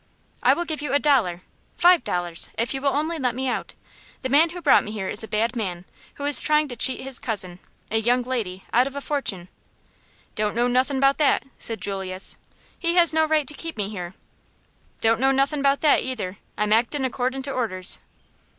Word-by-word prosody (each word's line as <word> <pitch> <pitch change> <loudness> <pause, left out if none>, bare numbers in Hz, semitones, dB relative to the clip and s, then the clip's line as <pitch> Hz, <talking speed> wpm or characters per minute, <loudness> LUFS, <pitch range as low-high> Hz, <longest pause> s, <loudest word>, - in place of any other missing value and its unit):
"I - - +4
will 345 - -3
give 310 -3 -4
you 290 -3 -3
a 285 - +4
dollar 220 -13 +1 0.3
five 350 -1 +5
dollars 175 -1 -3
if 235 +3 0
you 270 - -4
will 280 - +2
only 310 +4 -2
let 250 -3 -1
me 260 +1 -2
out. 250 - -4 0.5
The 260 - -2
man 305 +5 +5
who 355 +2 -8
brought - - +4
me 210 - -7
here 200 -3 -4
is 210 - -2
a - - -7
bad 220 +4 -1
man, 185 -6 -4 0.3
who 285 - -6
is 290 -1 +10
trying 305 0 +2
to 245 - -6
cheat 260 - 0
his 265 -2 -5
cousin 185 -6 0 0.3
a 220 - +1
young 245 +3 +1
lady 220 -7 -4
out 245 +3 +4
of 275 - -8
a - - -3
fortune." 250 -12 -3 0.9
"Don't 210 -1 -1
know 240 +1 +2
nothin' 260 +2 +1
'bout 275 +2 +3
that," 295 -3 +2
said 225 -1 -3
Julius. 190 -1 -2 0.4
"He 340 0 0
has 340 -3 +4
no 315 0 +3
right 310 -1 +1
to 300 - -2
keep 330 0 -7
me 205 -1 -2
here." 180 -3 -7 0.9
"Don't 225 0 +2
know 265 +1 +3
nothin' 275 +2 +1
'bout 275 0 +2
that, 300 - +4
either. 205 -7 -5 0.2
I'm 210 0 +1
actin' 250 +5 +1
accordin' 260 +1 -2
to 275 - -3
orders." 200 -8 -1
255 Hz, 210 wpm, -23 LUFS, 210-285 Hz, 0.9 s, is